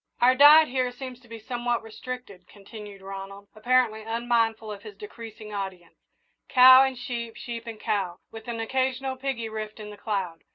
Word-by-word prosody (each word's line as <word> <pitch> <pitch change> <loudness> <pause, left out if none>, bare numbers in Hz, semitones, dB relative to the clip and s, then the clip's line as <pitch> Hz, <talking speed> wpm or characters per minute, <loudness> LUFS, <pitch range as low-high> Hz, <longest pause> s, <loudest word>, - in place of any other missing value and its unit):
"Our 250 +1 +5
diet 295 +4 +8
here 255 -1 0
seems 250 0 -8
to 250 - -21
be 230 0 -9
somewhat 240 +1 -2
restricted," 225 -4 -9
continued 205 -1 -12
Ronald, 195 +1 -9
apparently 235 -1 +1
unmindful 225 -1 0
of 200 -1 -8
his 210 -1 -11
decreasing 215 0 -10
audience, 190 -3 -6 0.6
"cow 255 0 +9
and 265 -1 -1
sheep, 235 -3 -5
sheep 235 -1 -7
and 225 -2 -7
cow, 195 -6 -2
with 225 0 -11
an 235 -1 -4
occasional 260 +2 -1
piggy 260 -3 -3
rift 215 0 -6
in 210 -1 -8
the 205 - -11
cloud. 195 -6 -3
225 Hz, 170 wpm, -26 LUFS, 210-250 Hz, 0.6 s, cow